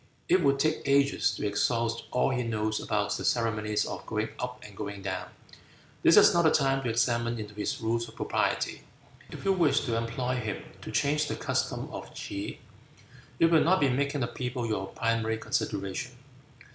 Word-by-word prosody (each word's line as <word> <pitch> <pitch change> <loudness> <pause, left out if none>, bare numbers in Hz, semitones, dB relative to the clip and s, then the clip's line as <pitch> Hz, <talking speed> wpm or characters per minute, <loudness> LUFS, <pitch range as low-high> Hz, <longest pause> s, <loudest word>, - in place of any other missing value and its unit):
It 185 +1 +4
would 140 -1 +4
take 155 +2 +1
ages 140 0 +3
to - - -4
exhaust 115 +3 0
all 125 - +2
he 125 -1 0
knows 110 -2 -1
about 105 -2 -1
the - - -4
ceremonies 110 -3 +1
of - - -5
going 110 0 -1
up 125 0 -4
and 105 -1 -12
going 100 -1 -6
down. 100 - -3 0.7
This - - +6
is - - +8
not 170 - +4
the 160 - +5
time 135 -2 +2
to 125 - -2
examine 115 0 +1
into 105 -1 -7
his 105 0 -3
rules 115 +1 0
of 115 - -15
propriety. - - -1 0.5
If - - -9
you 195 - +4
wish 170 -5 +3
to 120 -4 -1
employ 120 +2 -1
him 110 -4 -4 0.2
to - - -7
change 150 +1 +1
the - - -2
customs - - -2
of - - -7
T'se, 100 0 -5 0.8
you 165 - +5
will 165 -1 +5
not 185 +4 +4
be 140 - +3
making 140 +2 0
the 120 - +1
people 125 0 -3
your 105 -4 -2
primary 115 +1 0
consideration." 105 +3 -2
115 Hz, 185 wpm, -29 LUFS, 110-140 Hz, 0.8 s, is